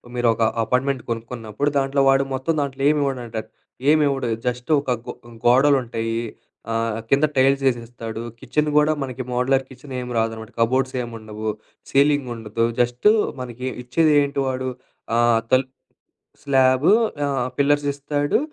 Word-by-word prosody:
మీరు 120 Hz, -1 st, +1 dB
ఒక 115 Hz, -, -1 dB, 0.2 s
అపార్ట్మెంట్ 130 Hz, +1 st, 0 dB
కొనుక్కున్నప్పుడు 115 Hz, +3 st, -3 dB
దాంట్లో 135 Hz, 0 st, +1 dB
వాడు 135 Hz, 0 st, +4 dB
మొత్తం 135 Hz, +5 st, -1 dB
దాంట్లో 135 Hz, -1 st, -4 dB
ఏమి 150 Hz, -1 st, +2 dB
ఇవ్వడండి 125 Hz, -5 st, -3 dB
అడు. -, -, -22 dB, 0.4 s
ఏం 155 Hz, -, +4 dB
ఇవ్వడు 135 Hz, -3 st, -1 dB, 0.2 s
జస్ట్ 125 Hz, +2 st, -3 dB
ఒక 135 Hz, -3 st, -3 dB, 0.2 s
గొ -, -, -4 dB, 0.3 s
గోడలుంటయి, 120 Hz, -3 st, +3 dB, 0.5 s
ఆహ్, 115 Hz, -1 st, -1 dB
కింద 140 Hz, +3 st, +4 dB
టైల్స్ 135 Hz, +1 st, +3 dB
ఏసిస్తాడు. 115 Hz, -2 st, -6 dB, 0.2 s
కిచెన్ 150 Hz, 0 st, 0 dB
కూడా 150 Hz, +1 st, +4 dB
మనకి 130 Hz, -1 st, -5 dB
మోడలర్ 130 Hz, +2 st, +2 dB
కిచెన్ 130 Hz, +1 st, -11 dB
ఏం 125 Hz, -, -6 dB
రాదనమాట. 110 Hz, 0 st, -3 dB
కబోర్డ్స్ 130 Hz, +3 st, +1 dB
ఏం 120 Hz, -, -5 dB
ఉండవు, 110 Hz, 0 st, -5 dB, 0.4 s
సీలింగ్ 140 Hz, -2 st, +3 dB
ఉండదు, 115 Hz, +1 st, -1 dB, 0.2 s
జస్టు 120 Hz, +11 st, +2 dB, 0.3 s
మనకి 125 Hz, +1 st, -6 dB, 0.2 s
ఇచ్చేదేంటి 145 Hz, +1 st, +2 dB
వాడు 130 Hz, 0 st, -2 dB, 0.5 s
ఆహ్, 120 Hz, -1 st, +4 dB
తల్ 130 Hz, 0 st, +4 dB, 0.8 s
స్లాబు, 130 Hz, +1 st, +3 dB, 0.3 s
ఆహ్, 135 Hz, -3 st, -1 dB
పిల్లర్స్ 145 Hz, 0 st, +2 dB
ఇస్తాడు, 145 Hz, +3 st, 0 dB
130 Hz, 140 wpm, -22 LUFS, 120-140 Hz, 0.8 s, వాడు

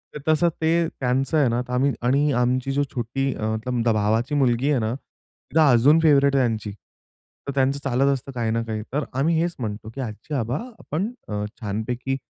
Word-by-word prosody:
तर -, -, -4 dB
तसं 160 Hz, +2 st, +4 dB
ते 165 Hz, +1 st, +2 dB
त्यांचं 130 Hz, +4 st, 0 dB
आहे 140 Hz, -4 st, +4 dB
ना. 120 Hz, +1 st, 0 dB
तर 125 Hz, 0 st, -7 dB
आम्ही 135 Hz, +3 st, +2 dB
आणि 140 Hz, +4 st, +2 dB
आमची 130 Hz, +2 st, 0 dB, 0.2 s
छोटी 130 Hz, +3 st, -1 dB
अ, -, -, -8 dB
मतलब 120 Hz, +1 st, -2 dB
भावाची 110 Hz, +7 st, +1 dB
मुलगी 130 Hz, 0 st, +2 dB
आहे 135 Hz, -, +2 dB
ना, 110 Hz, +1 st, -1 dB
ती 155 Hz, +3 st, -6 dB
अजून 145 Hz, +2 st, +6 dB
फेव्हरेट 140 Hz, -2 st, +5 dB
आहे 135 Hz, -, +4 dB
त्यांची. 110 Hz, -2 st, -3 dB
तर 105 Hz, +6 st, -14 dB
त्यांचं 135 Hz, +1 st, +2 dB
चालत 135 Hz, +1 st, +2 dB
असतं 135 Hz, +1 st, -5 dB
काही 115 Hz, -2 st, -1 dB
ना 115 Hz, +1 st, 0 dB
काही. 110 Hz, -1 st, -4 dB
तर 150 Hz, 0 st, 0 dB, 0.2 s
आम्ही 160 Hz, +3 st, +2 dB
हेच 170 Hz, 0 st, -1 dB
म्हणतो 110 Hz, -1 st, -5 dB
की 135 Hz, -, -4 dB
"आजी-आबा 120 Hz, +2 st, -3 dB, 0.2 s
आपण 190 Hz, +10 st, -3 dB, 0.2 s
अ, 105 Hz, -1 st, -3 dB, 0.2 s
छानपैकी 120 Hz, +6 st, -2 dB
130 Hz, 185 wpm, -23 LUFS, 115-140 Hz, 0.2 s, अजून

